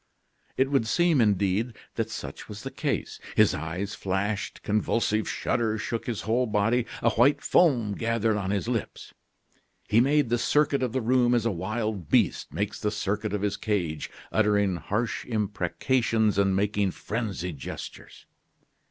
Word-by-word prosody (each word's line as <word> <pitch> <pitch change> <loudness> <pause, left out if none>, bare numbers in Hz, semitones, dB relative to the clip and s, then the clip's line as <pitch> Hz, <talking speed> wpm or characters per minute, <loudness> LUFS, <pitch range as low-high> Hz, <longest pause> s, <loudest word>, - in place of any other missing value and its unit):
It 135 +1 +2
would 135 -5 +2
seem, 165 +4 +3
indeed, 105 +2 +1 0.2
that - - -2
such - - -7
was - - -8
the - - -5
case. - - -3 0.2
His 110 -2 +5
eyes 90 +5 -4
flashed, 100 +2 -2
convulsive 110 +1 0
shudders 110 -2 0
shook 115 +2 -3
his 115 -4 -2
whole 120 +3 +1
body, 110 +3 +1 0.2
a 115 - +4
white 125 +6 +4
foam 120 - +3
gathered 115 0 0
on 100 -2 -2
his 100 +2 -1
lips. 120 -3 -4 0.7
He 110 +2 +4
made 140 0 +3
the 120 0 +1
circuit 145 +1 +2
of 125 -3 0
the 130 +2 -1
room 120 +1 +3
as 115 -2 +1
a 115 - +2
wild 105 0 -3
beast - - +2
makes 100 +1 -3
the 105 - 0
circuit 105 0 -2
of 105 -1 -2
his 100 0 0
cage, 95 -8 -2 0.2
uttering 105 -4 +2
harsh 110 +6 -2
imprecations 110 +1 0
and 95 -1 +3
making 100 0 +1
frenzied 95 - -4
gestures. - - -8
110 Hz, 155 wpm, -27 LUFS, 100-120 Hz, 0.7 s, His